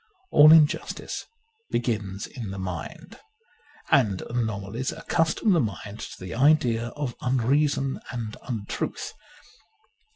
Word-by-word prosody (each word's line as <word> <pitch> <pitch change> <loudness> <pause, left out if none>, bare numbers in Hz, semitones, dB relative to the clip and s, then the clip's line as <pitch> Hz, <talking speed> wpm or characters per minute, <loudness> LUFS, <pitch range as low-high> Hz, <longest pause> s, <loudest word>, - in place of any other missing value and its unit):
All 150 +1 +9
injustice 160 -2 +2 0.4
begins 105 -5 -2
in 115 -6 -7
the 95 - -6
mind: 90 -3 -6 0.7
and 105 -9 +3
anomalies 110 0 -2
accustom 165 +6 +1
the 170 - +4
mind 105 - -4
to - - -8
the 95 -1 -7
idea 120 -3 +3
of 145 -5 -3
unreason 135 +2 +1
and 115 -4 -5
untruth. 110 -6 -4
120 Hz, 105 wpm, -26 LUFS, 105-140 Hz, 0.7 s, All